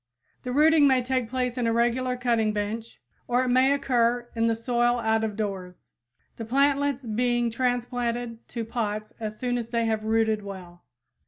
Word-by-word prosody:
The 250 - -5
rooting 300 +2 +5
may 260 -2 +3
take 255 -2 -1
place 250 0 -2
in 235 - +1
a - - +2
regular 245 +2 +1
cutting 230 -3 +1
bench, 215 +2 -4 0.3
or 245 +1 +2
it 255 - -1
may 255 +2 +4
occur 240 -3 +1
in 230 0 +2
the 230 - +2
soil 240 +1 +1
out 220 -1 +1
of 215 -2 -2
doors, 195 -4 -5 0.5
the 230 - -5
plantlets 280 +2 +1
being 240 +1 0
transplanted 245 -1 -2
to 230 -2 -5
pots 215 -2 -3
as 215 -1 -5
soon 245 0 -1
as 230 -1 -6
they 235 -1 0
have 220 -1 -1
rooted 220 -1 +1
well. 180 -3 -10
235 Hz, 175 wpm, -26 LUFS, 220-250 Hz, 0.5 s, rooting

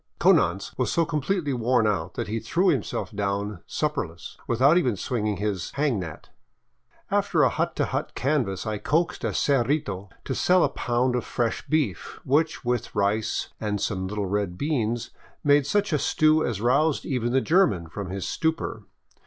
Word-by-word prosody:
Konanz 85 +4 +3
was 125 - +1
so 165 - +2
completely 155 0 -1
worn 120 -1 +2
out 95 -5 -1
that - - -3
he 110 +2 -2
threw 175 - +1
himself 135 - -1
down 100 -2 -2
sup 150 -1 -1
perless, 85 - -6
without 130 +7 +4
even 130 - +2
swinging 105 -2 -1
his 100 -3 -2
" - - -25
hang 140 -7 +1
net." 85 -4 -8 0.8
After - - +2
a - - +5
hut - - -1
to - - +1
hut - - -3
canvass 130 -9 0
I 105 -1 -2
coaxed 165 +8 0
a - - +1
cerrito 120 -8 0 0.2
to 130 - -2
sell 180 +6 +3
a - - +3
pound 125 -1 0
of 125 - -1
fresh 115 -2 -2
beef, 145 - -1
which, 150 +1 +1
with 120 -2 -1
rice 105 +2 0
and 105 -2 -2
some 95 -2 -2
little 105 +1 -2
red 95 -2 -2
beans, 120 -5 -1 0.3
made 145 -1 +4
such 205 +2 +1
a 150 - +2
stew 155 +2 +3
as 110 -5 -2
roused 140 +6 +2
even 120 -3 -1
the 135 - +4
German 155 - +2
from 95 +4 -6
his 95 0 -4
stupor. 160 0 -1
120 Hz, 180 wpm, -25 LUFS, 100-150 Hz, 0.8 s, a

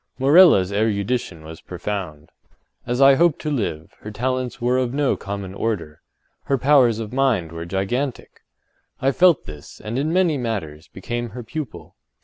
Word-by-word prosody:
Morella’s 140 - +6
erudition 105 -4 -1
was 80 0 -10
profound. 90 -5 -6 0.6
As 125 +2 -1
I 135 0 +8
hope 165 +2 +3
to 155 - -4
live, 95 - -3
her 105 - -8
talents 125 +3 -3
were 125 +1 +1
of 125 0 -2
no 145 -2 +1
common 100 -1 -6
order—her 100 - -5
powers 130 -4 +4
of 110 0 -6
mind 125 -12 +1
were 85 0 -6
gigantic. 115 +9 -3 0.6
I 135 - +2
felt 175 +2 +4
this, 75 -1 -11
and, 115 +4 -4
in 155 +3 -1
many 175 -5 +2
matters, 85 -10 -4
became 120 +5 -5
her 120 +3 -8
pupil. 110 - -7
120 Hz, 150 wpm, -22 LUFS, 95-135 Hz, 0.6 s, I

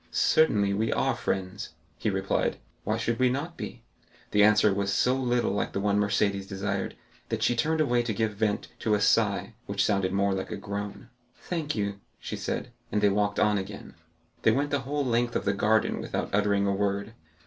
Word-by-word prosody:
"Certainly, 105 -11 +3
we 110 +3 0
are - - +1
friends," 95 +1 -3 0.2
he - - -1
replied; 95 0 0 0.3
"why 110 +2 0
should 115 0 -1
we 130 -1 +4
not 145 +7 -3
be?" 120 - -7 0.5
The 105 - +5
answer 105 -1 +5
was 100 0 -1
so 125 +5 +3
little 125 -2 +1
like 100 - -2
the - - -1
one 100 0 +2
Mercédès 100 -1 +1
desired, 95 +1 -3 0.3
that - - -1
she 120 - +3
turned 160 +6 +1
away 125 -5 +3
to 120 -1 -2
give 110 +1 0
vent 105 0 -1
to 110 -2 +2
a - - 0
sigh, 105 +1 +2
which 100 0 +1
sounded 100 -3 +1
more 100 0 +2
like 95 0 -3
a - - -4
groan. 100 +3 -6 0.3
"Thank 160 -4 -3
you," 100 -2 -2 0.2
she - - -5
said. 125 - -4 0.2
And 105 - +1
they 105 - +4
walked 100 0 +1
on 105 -1 +3
again. 100 +1 -8 0.5
They - - +4
went 140 +6 +1
the 145 - +2
whole 145 -1 0
length 120 -1 +1
of - - -1
the 100 - +2
garden 110 +2 +2
without - - -3
uttering 100 -1 +2
a 100 - +1
word. 100 +2 -1
105 Hz, 200 wpm, -27 LUFS, 100-120 Hz, 0.5 s, The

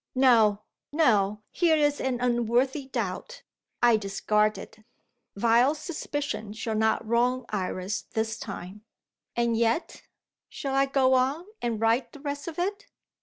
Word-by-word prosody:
No, 225 -6 +4 0.3
no 210 -9 +2
here 335 -3 +3
is 290 -1 +1
an 255 -2 -1
unworthy 250 +3 +1
doubt. - - -4 0.4
I 240 -2 +6
discard 210 +1 +1
it. - - -11 0.6
Vile 235 +7 +3
suspicion 290 - -4
shall 225 0 -3
not 220 0 +1
wrong 245 +2 +1
Iris 190 0 -2
this 220 +1 -3
time. 200 0 -8 0.5
And 235 -1 +1
yet 230 +7 0 0.5
Shall 275 -1 -4
I 275 0 +3
go 270 -1 +3
on, 265 +6 +1 0.2
and 235 -3 -1
write 230 +3 +1
the 290 - -11
rest 285 +1 -5
of 325 - -6
it? 400 +4 -2
240 Hz, 135 wpm, -27 LUFS, 220-280 Hz, 0.6 s, I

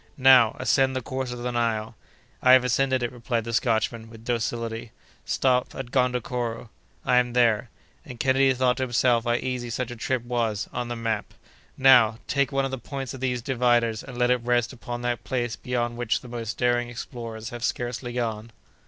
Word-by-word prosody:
"Now, 130 -4 +6
ascend 135 +1 +2
the 130 - -2
course 130 0 -4
of 120 -1 -6
the 125 - -1
Nile." 115 -2 -1 0.5
"I 125 - +6
have 130 -1 +7
ascended 130 +1 +1
it," 120 - -1
replied 120 -1 -2
the 115 +1 -5
Scotchman, 115 -1 0
with 115 0 -14
docility. 115 -1 -3 0.3
"Stop 125 - +1
at 130 -2 -6
Gondokoro." 125 -2 -1 0.3
"I 125 - +4
am 125 -1 +2
there." 115 -4 +3 0.3
And 125 -2 -10
Kennedy 135 +1 +3
thought 125 0 +2
to 130 - -1
himself 120 -1 +2
how 120 - +2
easy 125 0 -2
such 125 +2 -3
a - - -6
trip 120 +1 -2
was—on 120 0 -2
the 120 - -4
map! 115 -2 -3 0.4
"Now, 125 -4 +6
take 140 0 0
one 135 0 +1
of 135 - -3
the 135 - -4
points 135 +1 -6
of 135 - -8
these 125 -2 -1
dividers 120 -3 +2
and 135 -2 -9
let 125 0 +3
it 125 -1 +2
rest 120 0 +1
upon 120 -1 -6
that 120 -1 -2
place 120 -3 -2
beyond 120 -1 -2
which 120 -2 0
the 125 - -11
most 115 -2 -5
daring 120 0 +1
explorers 115 -2 -7
have 120 -1 -7
scarcely 120 -1 -3
gone." 115 -2 -3
120 Hz, 190 wpm, -25 LUFS, 115-125 Hz, 0.5 s, have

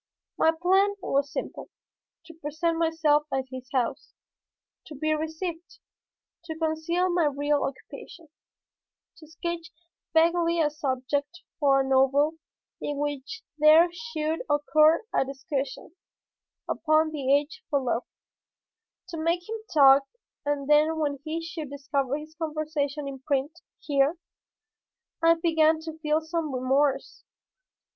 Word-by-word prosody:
My 320 - +4
plan 380 +5 +2
was 280 0 0
simple; - - -6 0.6
to 330 - -12
present 330 +2 -2
myself 315 -2 +2
at 265 0 0
his 255 -1 -8
house, 255 -4 -2 0.7
to 305 - -9
be 310 +3 0
received, 320 +2 -5 0.7
to 320 -2 -6
conceal 320 +3 0
my 345 -2 +2
real 290 0 +1
occupation, 305 +4 -8 0.9
to 315 -3 -15
sketch 335 +1 -5 0.4
vaguely 335 +1 +3
a 300 -2 +2
subject 285 +3 -2 0.2
for 275 -2 +4
a 265 - -2
novel 275 +4 +3 0.4
in 290 - -3
which 290 +9 -4 0.2
there 310 +3 +7
should 315 -1 -3
occur 305 +4 +4
a - - +3
discussion 275 +1 -5 0.8
upon 310 0 +2
the 275 -3 -1
Age 290 +2 -2
for 285 - +2
Love, 250 -2 -2 1.0
to 335 - -6
make 340 +2 0
him 450 +1 -4
talk 275 -2 +7 0.4
and 290 -2 -2
then 305 +2 +4
when 290 -3 -1
he 325 +1 -4
should 320 -4 -6
discover 280 -1 -2
his 305 +1 -10
conversation 305 -2 -3
in 270 -1 -6
print 275 +1 -1 0.3
here 285 +3 +1 1.0
I 330 0 +6
began 320 -1 +3
to 320 0 -8
feel 310 0 +1
some 320 -1 -3
remorse. 270 +2 0
305 Hz, 125 wpm, -26 LUFS, 280-325 Hz, 1.0 s, there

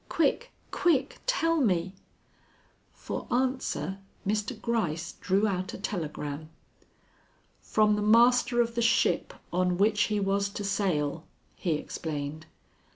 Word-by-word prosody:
Quick, 330 - +1 0.2
quick, 295 -6 +1
tell 330 -10 +2
me!" 185 -6 +1 1.0
For - - -6
answer 240 - -1 0.3
Mr. 210 +3 -1
Gryce 180 -8 -1
drew 200 +3 +2
out 185 -2 -2
a - - -6
telegram. 155 -5 -4 1.1
"From 215 -1 +3
the 210 - -1
master 240 +3 +5
of 235 0 -1
the 235 - -1
ship 230 +2 +2 0.2
on 180 0 +1
which 210 +2 +3
he 210 -1 0
was 200 0 +1
to 205 +1 -6
sail," 175 -6 -1 0.3
he 170 - -1
explained. 150 0 -5
200 Hz, 120 wpm, -28 LUFS, 175-235 Hz, 1.1 s, master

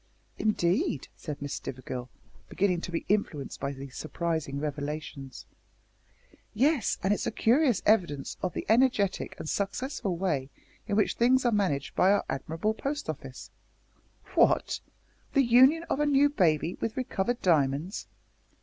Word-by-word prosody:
"Indeed!" 215 - 0
said 150 -4 -6
Miss 145 - -4
Stivergill, 125 -1 -6 0.4
beginning 185 -3 +1
to 175 - -6
be 165 - -3
influenced 180 -9 -1
by 140 0 -2
these 135 -1 -9
surprising 160 -3 -3
revelations. 145 -2 -5 1.1
"Yes, 275 - +2
and 195 +2 +3
it's 210 - -2
a - - 0
curious 245 - +2
evidence 170 -10 +2
of 185 -3 -2
the - - -3
energetic 225 -4 +2
and 160 - -7
successful 200 - -2
way 150 -8 -1 0.4
in 205 - 0
which 210 - +2
things 255 +2 +4
are 240 - +4
managed 185 -10 0
by 190 - +5
our 205 - +2
admirable 160 +10 -2
Post 285 +6 -3
Office - - -10 0.4
" - - -26
"What! - - +3 0.6
the 275 - +5
union 260 +7 +6
of 295 - -2
a 295 - +2
new 285 0 +4
baby 170 - +1
with 225 +2 -2
recovered 245 -2 -1
diamonds?" 155 +1 +1
190 Hz, 145 wpm, -28 LUFS, 150-240 Hz, 1.1 s, union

